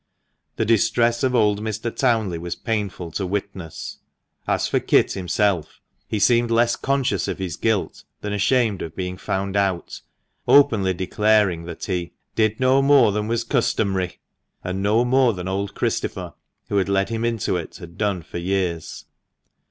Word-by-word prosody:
The 110 Hz, -, 0 dB
distress 115 Hz, +2 st, +2 dB
of 130 Hz, -1 st, +1 dB
old 105 Hz, -3 st, +3 dB
Mr. 110 Hz, +1 st, -4 dB
Townley 110 Hz, -9 st, +1 dB
was 85 Hz, 0 st, -4 dB
painful 100 Hz, -5 st, -3 dB
to 95 Hz, -, -2 dB
witness. 95 Hz, -4 st, -5 dB, 0.5 s
As -, -, +1 dB
for -, -, +1 dB
Kit -, -, +3 dB
himself, 95 Hz, -3 st, -1 dB, 0.3 s
he 110 Hz, -, -2 dB
seemed 120 Hz, +3 st, +3 dB
less 115 Hz, +1 st, +3 dB
conscious 130 Hz, -9 st, 0 dB
of -, -, -3 dB
his 95 Hz, -3 st, -4 dB
guilt 110 Hz, -4 st, -1 dB, 0.2 s
than 105 Hz, 0 st, -3 dB
ashamed 105 Hz, 0 st, +1 dB
of 80 Hz, -1 st, -6 dB
being 90 Hz, 0 st, -4 dB
found 95 Hz, +1 st, -3 dB
out, 95 Hz, -4 st, -1 dB, 0.5 s
openly 100 Hz, -10 st, +5 dB
declaring 100 Hz, -2 st, +2 dB
that 85 Hz, -1 st, -7 dB
he 90 Hz, -3 st, -3 dB, 0.2 s
"did 110 Hz, -1 st, +1 dB
no 130 Hz, +1 st, +4 dB
more 135 Hz, -5 st, +5 dB
than 105 Hz, +1 st, -2 dB
was 115 Hz, 0 st, 0 dB
customary" 100 Hz, -7 st, 0 dB, 0.5 s
and 95 Hz, +1 st, -3 dB
no 110 Hz, +4 st, +3 dB
more 130 Hz, -1 st, +3 dB
than 90 Hz, -1 st, -6 dB
old 100 Hz, +1 st, -3 dB
Christopher, -, -, -2 dB, 0.4 s
who 100 Hz, -, 0 dB
had 100 Hz, 0 st, +1 dB
led 100 Hz, +1 st, +1 dB
him 115 Hz, 0 st, -2 dB
into 115 Hz, -5 st, 0 dB
it, 85 Hz, -2 st, -5 dB
had 85 Hz, -2 st, -11 dB
done 100 Hz, -4 st, -1 dB
for 85 Hz, -, -6 dB
years. 90 Hz, -2 st, -2 dB
100 Hz, 160 wpm, -22 LUFS, 95-115 Hz, 0.5 s, openly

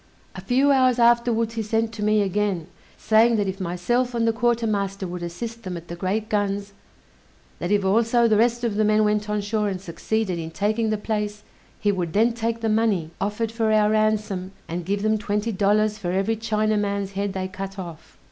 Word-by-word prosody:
A -, -, -8 dB
few 270 Hz, +3 st, +3 dB
hours 255 Hz, -2 st, +4 dB
afterwards 235 Hz, -1 st, +3 dB
he 225 Hz, -, -2 dB
sent 225 Hz, +1 st, -1 dB
to 210 Hz, -, -7 dB
me 210 Hz, 0 st, +3 dB
again, 195 Hz, -3 st, -1 dB, 0.3 s
saying, 225 Hz, +2 st, +4 dB
that 205 Hz, -2 st, 0 dB
if 190 Hz, +1 st, -4 dB
myself 240 Hz, +8 st, -1 dB
and 230 Hz, -1 st, +1 dB
the 225 Hz, -, +3 dB
quartermaster 215 Hz, -5 st, 0 dB
would 180 Hz, 0 st, -6 dB
assist 225 Hz, +7 st, -6 dB
them 185 Hz, -4 st, -5 dB
at 170 Hz, 0 st, -11 dB
the 170 Hz, -, -5 dB
great 200 Hz, +5 st, -2 dB
guns, 205 Hz, -1 st, -1 dB, 0.9 s
that 175 Hz, -, -3 dB
if 205 Hz, -2 st, +2 dB
also 230 Hz, +4 st, +3 dB
the 220 Hz, -, +3 dB
rest 235 Hz, +2 st, +2 dB
of 220 Hz, -4 st, -1 dB
the 215 Hz, -, +3 dB
men 215 Hz, 0 st, +3 dB
went 210 Hz, 0 st, 0 dB
on 210 Hz, 0 st, 0 dB
shore 210 Hz, 0 st, -1 dB
and 190 Hz, -2 st, -3 dB
succeeded 190 Hz, +1 st, -2 dB
in 160 Hz, -1 st, -5 dB
taking 215 Hz, +6 st, 0 dB
the 215 Hz, -, 0 dB
place, 210 Hz, -1 st, -3 dB, 0.4 s
he 205 Hz, -, +2 dB
would 175 Hz, -4 st, -3 dB
then 230 Hz, +3 st, +3 dB
take 230 Hz, 0 st, -2 dB
the 225 Hz, -, 0 dB
money 215 Hz, -7 st, +1 dB
offered 210 Hz, +2 st, -1 dB
for 225 Hz, -1 st, 0 dB
our 215 Hz, -1 st, +4 dB
ransom, 210 Hz, -3 st, 0 dB
and 170 Hz, +1 st, -4 dB
give 200 Hz, +1 st, -1 dB
them 215 Hz, 0 st, +2 dB
twenty 210 Hz, +2 st, -1 dB
dollars 210 Hz, +1 st, +1 dB
for 175 Hz, -, -2 dB
every 195 Hz, +4 st, +1 dB
Chinaman's 210 Hz, -2 st, -1 dB
head 200 Hz, 0 st, -2 dB
they 190 Hz, -1 st, -3 dB
cut 195 Hz, 0 st, -7 dB
off. 170 Hz, -4 st, -9 dB
210 Hz, 205 wpm, -23 LUFS, 195-225 Hz, 0.9 s, hours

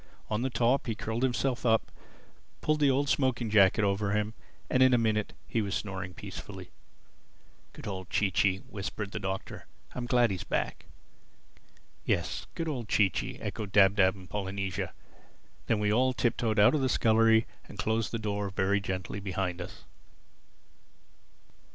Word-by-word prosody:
On 105 Hz, +1 st, 0 dB
the 130 Hz, -, 0 dB
top, 120 Hz, +3 st, +1 dB
he 115 Hz, -, -1 dB
curled 115 Hz, +2 st, -3 dB
himself 130 Hz, 0 st, 0 dB
up, 115 Hz, -2 st, +2 dB, 0.7 s
pulled 155 Hz, 0 st, +1 dB
the 145 Hz, -2 st, +4 dB
old 140 Hz, +2 st, +2 dB
smoking 130 Hz, -5 st, +1 dB
jacket 105 Hz, 0 st, +5 dB
over 100 Hz, 0 st, +1 dB
him, 105 Hz, +1 st, 0 dB, 0.3 s
and 130 Hz, -, +2 dB
in 130 Hz, -1 st, +6 dB
a -, -, +4 dB
minute 110 Hz, -2 st, 0 dB
he 115 Hz, -, 0 dB
was 100 Hz, -1 st, -2 dB
snoring 95 Hz, -3 st, -4 dB
peacefully. -, -, -8 dB, 1.0 s
"Good -, -, -10 dB
old 95 Hz, -2 st, -5 dB
Chee 100 Hz, -2 st, +1 dB
Chee!" 95 Hz, 0 st, +2 dB
whispered 100 Hz, 0 st, -5 dB
the -, -, -4 dB
Doctor. 95 Hz, 0 st, -5 dB, 0.3 s
"I'm 125 Hz, -1 st, -4 dB
glad 120 Hz, -3 st, +3 dB
he's 95 Hz, -, -3 dB
back." -, -, -2 dB, 1.2 s
"Yes—good 125 Hz, -, -2 dB
old 125 Hz, -8 st, -4 dB
Chee 100 Hz, -3 st, +4 dB
Chee!" -, -, -4 dB
echoed 105 Hz, -3 st, -4 dB
Dab 100 Hz, -1 st, +6 dB
Dab 95 Hz, -2 st, +4 dB
and 95 Hz, -2 st, -12 dB
Polynesia. 95 Hz, -1 st, -3 dB, 0.8 s
Then 115 Hz, -, +2 dB
we 105 Hz, 0 st, +2 dB
all 130 Hz, +3 st, +3 dB
tip 120 Hz, -1 st, +1 dB
toed 110 Hz, -2 st, -1 dB
out 105 Hz, +7 st, +6 dB
of 150 Hz, -, +1 dB
the 130 Hz, -, +1 dB
scullery 110 Hz, -1 st, +4 dB, 0.2 s
and -, -, -11 dB
closed 110 Hz, +1 st, 0 dB
the 115 Hz, -, -1 dB
door 105 Hz, -2 st, -2 dB
very 95 Hz, +1 st, +1 dB
gently 95 Hz, +1 st, -4 dB
behind 95 Hz, -2 st, -3 dB
us. 85 Hz, -, -9 dB
105 Hz, 165 wpm, -29 LUFS, 95-120 Hz, 1.2 s, in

